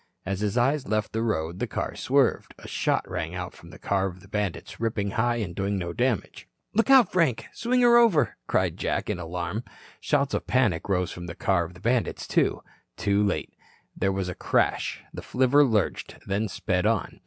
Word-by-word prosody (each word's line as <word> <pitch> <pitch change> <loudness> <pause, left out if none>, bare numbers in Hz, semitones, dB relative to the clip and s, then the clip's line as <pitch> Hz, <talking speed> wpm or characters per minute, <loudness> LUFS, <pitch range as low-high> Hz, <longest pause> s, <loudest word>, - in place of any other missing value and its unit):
As 95 0 -2
his 105 +2 -1
eyes 135 +3 +2
left 110 -1 -1
the 110 - 0
road, 85 -6 -1
the - - -1
car - - -3
swerved. - - +1
A - - -11
shot - - 0
rang 80 +2 -4
out 90 -1 -5
from 85 - -15
the - - -12
car 95 -1 0
of 90 -1 -9
the 100 - -16
bandits, 105 -3 -3
ripping 110 -3 -1
high 120 +3 +1
and 105 -7 -3
doing 100 +2 -1
no 85 -2 -3
damage. 120 -3 -1 0.3
"Look 225 +5 +2
out, 260 -7 +7
Frank. 160 -10 +1
Swing 250 +2 +1
her 240 -1 +7
over," 225 -11 +4
cried - - +1
Jack - - -1
in - - -3
alarm. 90 +6 -4 0.4
Shouts 140 -2 +1
of - - -2
panic 105 -10 +1
rose 90 -2 +1
from 85 0 -7
the 85 - -7
car 85 -3 +1
of 90 +2 -11
the - - -13
bandits, 120 +3 0
too. - - +1 0.3
Too 100 0 +2
late. 100 - -1 0.4
There 95 +1 +1
was 95 -1 -2
a 90 - -3
crash, - - 0
the - - -6
flivver 130 +3 +3
lurched, 110 -7 0
then 100 +3 -1
sped 90 0 -1
on. 115 -3 -1
105 Hz, 200 wpm, -26 LUFS, 90-125 Hz, 0.4 s, out